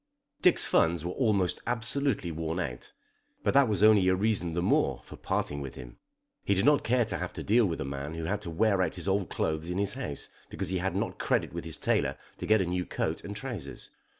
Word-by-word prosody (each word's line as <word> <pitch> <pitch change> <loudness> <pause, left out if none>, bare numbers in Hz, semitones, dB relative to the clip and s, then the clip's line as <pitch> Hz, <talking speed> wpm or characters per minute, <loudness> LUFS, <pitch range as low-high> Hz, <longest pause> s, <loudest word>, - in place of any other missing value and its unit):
Dick's 180 - +4
funds 85 0 +2
were 90 - -2
almost 100 -6 +1
absolutely 125 -4 0
worn 80 +2 -3
out. 60 -8 -5 0.5
But - - +2
that 140 -1 +6
was 105 -1 +1
only 105 -3 +6
a 95 - +4
reason 95 -4 0
the 85 - 0
more - - +1
for - - -10
parting 70 0 -2
with 70 -2 -7
him. 60 -2 -10 0.5
He 100 - +2
did 95 - +1
not 145 -1 +5
care 120 0 +2
to 110 - -3
have 90 - -3
to - - -6
deal 110 +1 +4
with 85 - -3
a - - -2
man 70 +3 -5
who 80 - -4
had 100 +5 -2
to 100 - -5
wear 95 +3 +2
out 90 - 0
his 90 +1 -6
old 95 -1 +1
clothes 80 +2 -2
in 90 - -2
his 100 0 0
house 125 - -5 0.2
because 95 -3 -3
he 95 -1 0
had 95 +2 -2
not - - -2
credit - - 0
with 85 -1 -5
his 80 - -5
tailor - - +1 0.2
to - - -4
get 110 -1 +5
a - - +1
new 90 +1 -1
coat - - -3
and 100 - -6
trousers. 105 - -6
95 Hz, 235 wpm, -29 LUFS, 80-110 Hz, 0.5 s, that